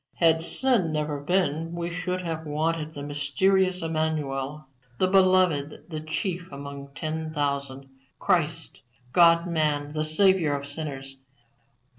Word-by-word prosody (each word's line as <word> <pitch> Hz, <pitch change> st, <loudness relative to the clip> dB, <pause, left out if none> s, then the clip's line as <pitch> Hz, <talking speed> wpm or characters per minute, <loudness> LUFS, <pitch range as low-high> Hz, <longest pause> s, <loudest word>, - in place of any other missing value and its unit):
"Had 165 Hz, -1 st, +4 dB
sin 220 Hz, -2 st, +1 dB
never 150 Hz, -1 st, -2 dB
been 165 Hz, 0 st, 0 dB
we 170 Hz, 0 st, -3 dB
should 180 Hz, +1 st, -3 dB
have 160 Hz, -2 st, -4 dB
wanted 155 Hz, +1 st, -1 dB
the 145 Hz, -, -7 dB
mysterious 180 Hz, +6 st, +1 dB
Emmanuel, 150 Hz, -3 st, -2 dB, 0.3 s
the 185 Hz, -, +3 dB
Beloved, 185 Hz, -7 st, +3 dB
the 155 Hz, -, -3 dB
Chief 175 Hz, +3 st, -4 dB
among 140 Hz, 0 st, -8 dB
ten 160 Hz, 0 st, -3 dB
thousand, 140 Hz, -2 st, -2 dB, 0.3 s
Christ, -, -, -1 dB, 0.3 s
God 170 Hz, 0 st, +6 dB
man, 150 Hz, -4 st, 0 dB
the 155 Hz, 0 st, -1 dB
Saviour 160 Hz, -1 st, +3 dB
of 140 Hz, 0 st, -5 dB
sinners. 140 Hz, -2 st, -5 dB
155 Hz, 125 wpm, -26 LUFS, 145-175 Hz, 0.3 s, God